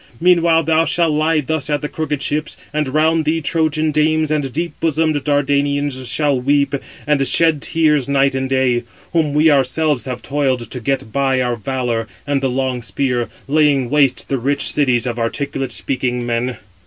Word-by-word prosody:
Meanwhile 170 -2 +3
thou 160 +1 +2
shall 165 -1 +1
lie 155 +1 +1
thus 155 0 -2
at 150 0 -1
the - - -1
crooked 150 -2 -3
ships; 150 +1 -2 0.2
and 150 -1 0
round 155 +3 +2
thee 155 +2 0
Trojan 155 0 0
[dames] 155 +1 +1
and 145 -4 -1
deep 170 +5 -3
bosomed 155 -2 0
Dardanians 145 -2 0
shall 145 -3 +1
weep 140 +2 +1 0.3
and 140 -2 +2
shed 160 +2 +4
tears 150 -5 +1
night 140 -1 +2
and 130 0 -2
day; 130 -2 +1 0.3
whom 155 -4 +1
we 155 +1 +5
ourselves 140 +1 +1
have 125 -2 -5
toiled 130 -5 -1
to 125 - -5
get 125 -2 -2
by 135 +1 +1
our 125 -1 0
valour 120 -1 -2 0.2
and 140 -1 0
the 135 - 0
long 130 -1 -2
spear, 125 0 -2 0.2
laying 145 -3 +2
waste 140 -3 +2
the 135 - -1
rich 140 +4 +1
cities 130 -5 +1
of 120 -1 -3
articulate 135 +3 -3
speaking 125 -2 -2
men." 120 0 -2
140 Hz, 175 wpm, -18 LUFS, 130-155 Hz, 0.3 s, we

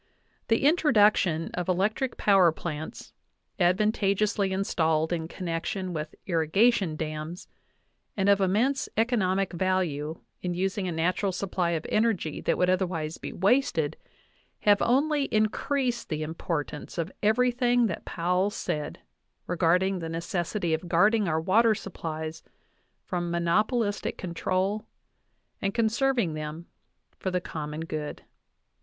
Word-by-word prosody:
The 225 +4 +2
introduction 210 - +3
of 180 0 -3
electric 210 +8 0
power 195 -4 +5
plants, 155 -1 -6 0.5
advantageously 200 +1 +2
installed 160 -4 +1
in 160 -2 -2
connection 180 +2 -3
with 155 -1 -5
irri 165 -4 0
gation 195 -5 +3
dams, 155 +2 -5 0.7
and 195 0 +1
of 200 0 +5
immense 225 +9 +1
economic 195 -5 +1
value 170 -4 -1 0.2
in 180 -1 -2
using 190 +1 -1
a - - -1
natu 170 +2 0
ral 200 -2 +1
supply 185 -1 -1
of 155 - -7
energy 215 -8 0
that - - +1
would 180 - +3
otherwise 175 -4 -1
be - - -6
wasted, 195 - +1 0.7
have 205 -1 +4
only 285 +3 +2
increased 240 +3 0
the 155 -2 -2
importance 155 -2 -4
of 170 +2 -2
everything 245 +2 +3
that 185 -7 -3
Powell 180 +3 0
said 150 -7 -4 0.4
re 175 - -2
garding 180 +3 +2
the 165 -1 -5
necessity 170 +1 -2
of 165 +2 -3
guarding 210 +5 +4
our 160 -1 +1
water 215 +6 +4
supplies 160 -5 -6 0.6
from 175 -1 -2
monopolistic 205 +6 0
control 185 +4 -1 0.7
and 195 +1 -1
conserving 230 - +1
them 155 +2 -6 0.5
for 190 - -2
the 180 0 0
common 155 -3 -5
good. 155 -2 -5
185 Hz, 125 wpm, -27 LUFS, 165-215 Hz, 0.7 s, power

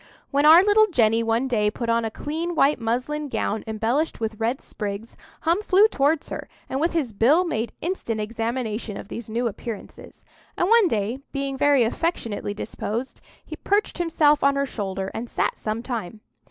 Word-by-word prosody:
When 285 +1 +3
our 330 +4 +9
little 425 +1 +5
Jenny 230 - +3
one 230 +3 +1
day 210 -5 +2
put 235 +2 -5
on 230 0 +2
a - - -1
clean 325 +9 -4
white 285 -2 +3
muslin 255 +6 -2
gown 215 -4 -2
embellished 225 +8 -1
with 220 -1 -3
red 235 +4 0
sprigs, 205 +1 -6 0.3
Hum 340 +5 +2
flew 410 +1 +5
towards 295 -5 +1
her, - - -6 0.2
and 265 - -2
with 335 +2 +1
his 285 -9 -1
bill 270 - +4
made 235 -9 -2
instant 315 -11 -2
examination 225 -1 -3
of - - -9
these 230 -1 -7
new 235 +3 -1
appearances; 225 -1 -7 0.3
and 355 - +2
one 460 -3 +6
day, 225 -1 -1
being 275 -1 -3
very 285 -2 +4
affectionately 225 -6 -2
disposed, 230 +4 -4 0.4
perched 405 -2 0
himself 310 -3 +3
on 280 0 +4
her 280 0 +1
shoulder, 195 -6 -4
and 235 +1 -5
sat - - 0
some 215 +2 -3
time. 220 -4 -5
245 Hz, 175 wpm, -24 LUFS, 220-300 Hz, 0.4 s, our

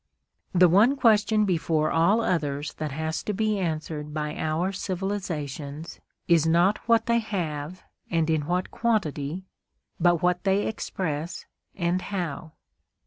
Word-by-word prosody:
The 180 0 +6
one 210 +10 +5
question 215 -4 +3
before 160 -4 +1
all 175 +8 +3
others 150 -7 -1
that 155 -2 -3
has 160 +3 -3
to 210 - -3
be 215 0 0
answered 155 -3 -3
by 150 0 -2
our 160 +4 -1
civilisations 170 -6 -4 0.3
is 165 -2 +4
not 175 +5 +3
what 230 -1 +4
they 235 -1 +3
have 175 -6 -4 0.3
and 165 -2 +1
in 155 -2 0
what 180 +1 -1
quantity, 185 -7 -1 0.5
but 175 -1 +3
what 180 0 +2
they 195 +1 +2
express 170 -6 -4 0.3
and 175 0 0
how. 170 -5 -4
175 Hz, 135 wpm, -26 LUFS, 155-195 Hz, 0.5 s, The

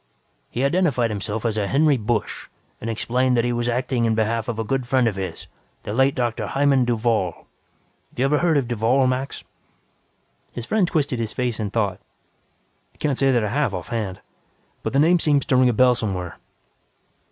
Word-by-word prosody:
"He 125 - -2
identified 140 -7 +1
himself 105 +2 -4
as 110 -2 0
a 100 - -1
Henry 145 +5 +3
Busch 110 -2 -2 0.3
and 115 - -4
explained 125 +3 0
that 115 - +3
he 120 - 0
was 120 0 -1
acting 125 0 0
in 110 -1 +1
behalf 110 +1 0
of 120 -2 -3
a 115 - -1
good 130 +2 -2
friend 130 -1 +2
of 105 - -1
his, 95 -1 -5 0.4
the 105 - -5
late 135 +3 +3
Dr. 120 -2 -1
Hymann 135 -2 +2
Duvall. 115 -6 -1 0.6
Have - - -28
you 130 - +2
ever 150 +2 +2
heard 170 -3 +2
of 135 -4 0
Duvall, 120 +3 +2
Max?" 130 +2 -2 1.1
His 120 - -6
friend 210 +1 +1
twisted 145 -7 0
his 110 -2 -3
face 125 -3 -2
in 105 -2 -2
thought. 100 -3 -1 1.0
"Can't 145 -3 0
say 135 -1 +3
that 120 -3 +2
I 105 - -1
have, 140 -5 0
off 90 - -7
hand. 105 -6 -3 0.6
But - - -4
the - - +2
name 170 +4 +4
seems 145 -3 +2
to 130 - +1
ring 125 0 +5
a - - +3
bell 125 +2 +4
somewhere." 95 -7 -4
120 Hz, 195 wpm, -22 LUFS, 110-135 Hz, 1.1 s, ring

